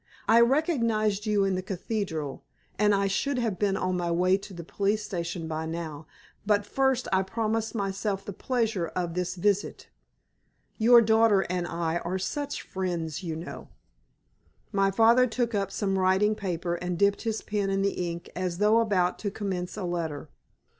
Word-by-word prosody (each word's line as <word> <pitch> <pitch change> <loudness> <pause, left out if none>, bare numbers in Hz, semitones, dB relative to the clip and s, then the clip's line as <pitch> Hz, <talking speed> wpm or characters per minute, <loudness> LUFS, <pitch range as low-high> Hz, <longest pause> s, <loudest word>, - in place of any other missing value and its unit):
I 230 +1 +6
recognized 230 - +1
you 205 -2 +3
in 195 - +1
the 185 - -1
cathedral, 185 -6 -4 0.4
and 210 -1 +4
I 200 0 +1
should 250 +8 0
have 225 -6 -1
been 200 -2 +1
on 185 0 -1
my 175 -1 -1
way 180 +2 +3
to 200 +1 -7
the 170 -2 -8
police 205 +5 -1
station 170 -3 -4
by 160 0 -3
now, 160 -2 -6 0.4
but 205 0 +2
first 265 +2 +1
I 190 - +4
promised 225 +3 -2
myself 195 -1 -2
the 200 - -5
pleasure 225 -6 -1
of 175 -2 -2
this 180 +1 -2
visit. 200 +2 -1 0.9
Your 235 +1 +7
daughter 220 -2 +4
and 180 -1 -1
I 170 -1 -1
are 175 +3 -3
such 285 +10 -3
friends, 170 -5 -3
you 165 -4 -4
know." 165 +2 -8 1.0
My 195 -1 +2
father 230 +5 +5
took 235 0 -1
up 195 -2 -1
some 195 -1 -1
writing 190 +3 +3
paper 180 -4 -3
and 180 0 -3
dipped 200 +2 +2
his 225 -1 -2
pen 205 -2 -1
in 195 0 +1
the 180 -3 -1
ink 170 0 -7
as 180 -1 -2
though 210 +3 +4
about 190 -6 +1
to 205 - -2
commence 190 -3 -4
a - - -4
letter. 165 -4 -3
195 Hz, 175 wpm, -27 LUFS, 175-215 Hz, 1.0 s, Your